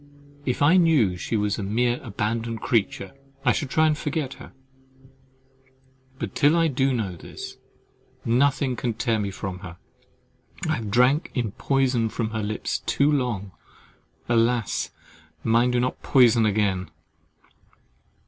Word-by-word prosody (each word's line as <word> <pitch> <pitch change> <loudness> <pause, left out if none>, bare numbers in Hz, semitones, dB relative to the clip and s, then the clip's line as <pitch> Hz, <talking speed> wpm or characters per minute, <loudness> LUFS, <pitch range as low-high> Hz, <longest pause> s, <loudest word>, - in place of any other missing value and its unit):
If 125 +3 +1
I 165 +6 +6
knew 150 - +4
she 100 +5 -2
was 105 0 0
a - - -2
mere 120 +5 0
abandoned 115 +1 -3
creature, 105 -4 -1 0.3
I 120 - +5
should 135 - -2
try 155 +3 +3
to 155 - +3
forget 150 -2 -3
her; - - -11 1.7
but 115 -6 -5
till 150 +4 +4
I 165 -1 +3
do 135 0 +1
know 105 -8 -2
this, 85 - -9 0.7
nothing 130 +2 +2
can 120 -2 -2
tear 115 -1 0
me 100 -1 -2
from 95 -1 -6
her, 90 -2 -10 0.9
I - - +1
have 110 -3 -5
drank 125 +7 +3
in 120 -5 -1
poison 130 -2 +1
from 110 0 -3
her 110 -1 -2
lips 105 +1 -2
too 140 +2 +3
long—alas! 115 0 -2 0.5
mine 115 +2 +3
do 125 0 +1
not 125 +1 -2
poison 120 -4 +5
again. 100 -3 0
120 Hz, 140 wpm, -24 LUFS, 105-135 Hz, 1.7 s, I